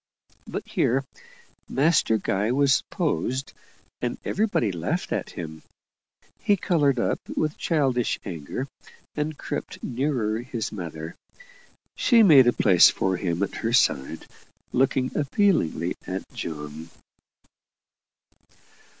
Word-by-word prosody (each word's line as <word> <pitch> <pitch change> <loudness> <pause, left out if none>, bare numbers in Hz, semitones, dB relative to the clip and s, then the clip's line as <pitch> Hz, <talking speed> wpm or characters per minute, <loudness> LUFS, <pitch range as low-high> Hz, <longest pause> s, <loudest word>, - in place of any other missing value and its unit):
But - - -5
here 135 +3 +1 0.7
Master 140 -5 +3
Guy 105 +2 0
was 135 0 +3
posed, 135 -6 -1 0.5
and - - -2
everybody 200 - +1
laughed 85 -3 -3
at - - -2
him. 80 -2 -6 0.8
He 205 - +2
coloured 145 -8 +2
up 120 - 0 0.2
with 155 -1 0
childish 135 -7 0
anger, 85 - -4 0.5
and 150 0 -3
crept - - -6
nearer 120 -4 -1
his 120 -2 -4
mother. 80 -4 -6 0.8
She 235 -3 +5
made 140 - +8
a - - +6
place 95 -5 +6
for 95 -1 0
him 85 0 -1
at 100 - -3
her 115 +1 -2
side, 70 - +2 0.5
looking 130 0 +1
appealingly 145 - +1
at 95 +1 -3
John. 75 +1 -6
120 Hz, 110 wpm, -25 LUFS, 90-145 Hz, 0.8 s, made